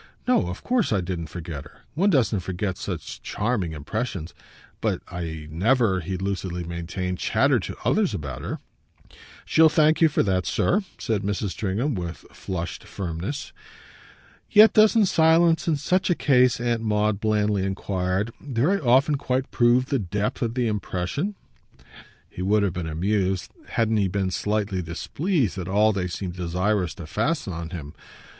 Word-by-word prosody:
"No, - - +3
of 90 - -6
course 245 -5 +1
I 105 - +2
didn't 85 -2 -4
forget 80 -3 -6
her. 75 - -17
One 185 +8 +2
doesn't 125 - +2
forget 95 +1 -3
such - - -6
charming 105 -7 -1
impressions. 90 - -4 0.5
But - - -1
I 80 -3 -5
never," 105 +3 +2
he 90 +2 -4
lucidly 95 -2 -3
maintained, 85 +2 -4
"chattered - - +2
to - - -6
others - - +2
about 70 -4 -5
her." - - -4 0.9
"She'll 160 0 +5
thank 155 +1 +3
you 160 - +7
for 150 - +2
that, 95 -3 0
sir," 200 - +2 0.2
said 110 -3 -1
Mrs. 100 0 -2
Stringham 110 +10 -1
with 85 -4 -5
a - - -22
flushed 85 -3 -5
firmness. 90 - -5 1.0
"Yet 215 0 +7
doesn't 215 0 +5
silence 165 -1 +4
in 160 - +3
such 185 +6 +1
a 175 - +3
case," 125 -6 +3
Aunt 120 -1 0
Maud 105 -2 +1
blandly 105 -2 +1
enquired, 95 +2 -1
"very 145 +9 +1
often 135 +2 +3
quite 130 -1 -1
prove 120 +1 +4
the 135 - +1
depth 105 +5 -2
of 115 -1 -1
the 125 -2 +1
impression?" 105 - -2 0.9
He - - -8
would 100 +3 +3
have 95 -4 0
been 85 -2 -4
amused, 95 +3 -1 0.2
hadn't 110 -1 +1
he 100 -2 +2
been 95 0 -1
slightly 105 -1 -1
displeased, 115 - -1
at 90 - -4
all 105 +3 +3
they 95 -2 -1
seemed 90 0 -5
desirous 90 +1 -1
to 85 - -8
fasten 110 - -1
on 85 0 -5
him. 75 -5 -7
100 Hz, 160 wpm, -24 LUFS, 90-125 Hz, 1.0 s, you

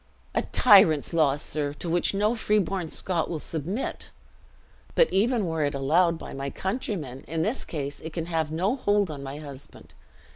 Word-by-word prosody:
"A - - +2
tyrant's 185 - +5
law, 150 -4 +3
sir, 145 -1 -3
to 170 - -6
which 170 +1 +2
no 210 +3 +2
freeborn 195 -6 0
Scot 170 -1 -2
will 165 - -2
submit! 165 - -4 0.9
But - - +4
even 225 +1 +2
were 160 -2 -1
it 145 0 -1
allowed 165 +5 +2
by - - -9
my 135 0 -4
countrymen, 185 - -4
in 160 +1 -1
this 225 +8 -1
case 145 -3 -5
it 160 - -7
can 165 +1 -3
have 160 -3 -1
no 185 +9 0
hold 205 -7 +1
on 145 -2 -7
my 140 +1 -6
husband. 145 -2 -10
165 Hz, 175 wpm, -26 LUFS, 145-195 Hz, 0.9 s, tyrant's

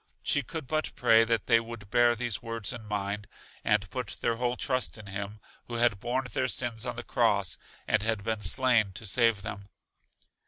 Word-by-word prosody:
She 145 - +2
could 155 +3 -6
but 155 +4 -2
pray 115 -2 +5
that 115 -2 0
they 115 -2 +5
would 115 -3 -9
bear 120 -1 +5
these 120 -2 -2
words 115 -4 -3
in 115 -2 -8
mind, 100 0 -3 0.4
and - - +2
put - - -4
their 115 -1 0
whole 125 +1 0
trust 130 -3 -1
in 105 - -11
Him 100 +2 -5 0.3
who 120 - -6
had 115 -4 +3
borne 125 +4 -1
their 130 - +1
sins 120 -3 -2
on - - -3
the - - -6
Cross, - - +1 0.3
and 110 - +3
had 110 -2 0
been 110 0 -2
slain 110 0 +4
to 100 - -8
save 115 -1 +2
them. 100 -2 -7
115 Hz, 195 wpm, -29 LUFS, 105-120 Hz, 0.4 s, pray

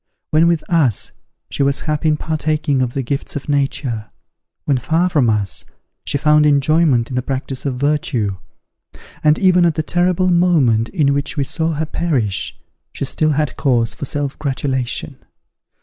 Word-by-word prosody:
When 160 +2 +4
with 170 -2 +1
us, 150 - +1 0.4
she - - -3
was 140 0 +2
happy 155 0 -1
in 155 -1 +2
partaking 155 -3 -1
of 125 -1 -2
the 135 - -1
gifts 140 +5 -4
of 140 - -5
nature; 135 -6 -1 0.6
when 140 -3 +1
far 165 +8 +1
from 140 -8 +3
us, 105 -3 -1 0.4
she - - 0
found 150 +1 +4
enjoyment 145 -3 +3
in - - -3
the 125 - +1
practice 135 +1 -4
of 130 - -2
virtue; 125 -7 0 0.9
and 150 0 +4
even 180 -2 +4
at 170 -3 +2
the 155 - -1
terrible 180 +2 +1
moment 150 -11 +3
in 145 -6 +1
which 140 +1 -3
we 140 - +2
saw 160 +4 -1
her 155 +1 -2
perish, 135 - -1 0.3
she 140 - -4
still 155 +3 +1
had 150 -2 -1
cause 120 -5 +1
for - - -6
self 145 0 -4
gratulation. 130 -3 -2
145 Hz, 165 wpm, -18 LUFS, 130-155 Hz, 0.9 s, When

